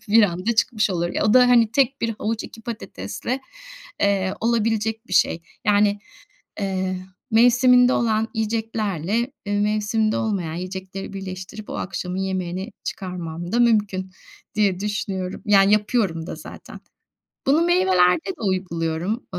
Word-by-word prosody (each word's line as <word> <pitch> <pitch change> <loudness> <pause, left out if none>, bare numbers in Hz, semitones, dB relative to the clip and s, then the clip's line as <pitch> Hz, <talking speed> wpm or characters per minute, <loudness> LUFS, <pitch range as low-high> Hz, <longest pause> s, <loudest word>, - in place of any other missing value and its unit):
bir 225 +1 +6
anda 190 +4 0
çıkmış 215 -2 +2
olur. 175 -1 -1
Ya, - - -1
o 215 - +3
da, 250 -1 +7
hani, 230 -3 +5
tek 275 +1 +2
1 230 - 0
havuç 220 +1 -2
2 225 - -11
patatesle, 215 - -5 0.6
eee, 195 -1 +1
olabilecek 225 0 0
bir - - -10
şey. 165 -2 +3 0.2
Yani, 205 0 +3 0.6
eee, 190 -1 -1 0.3
mevsiminde 245 +2 +5
olan 220 -1 +1
yiyeceklerle, 220 - -1
e, 205 - -2
mevsiminde 215 +1 +1
olmayan 190 -7 -2
yiyecekleri 190 +2 -6
birleştirip 190 +2 -7
o - - -4
akşamın 180 0 -4
yemeğini 190 +1 -3
çıkarmam 175 -2 -5
da 240 - +1
mümkün 205 -5 +2 0.4
diye 200 -3 +2
düşünüyorum. 195 -3 -3
Yani, 200 -1 +5
yapıyorum 205 -6 +1
da - - -5
zaten. - - -11 0.7
Bunu 300 +5 +4
meyvelerde 185 - +3
de - - -7
uyguluyorum. 185 +2 -2
205 Hz, 135 wpm, -22 LUFS, 185-225 Hz, 0.7 s, da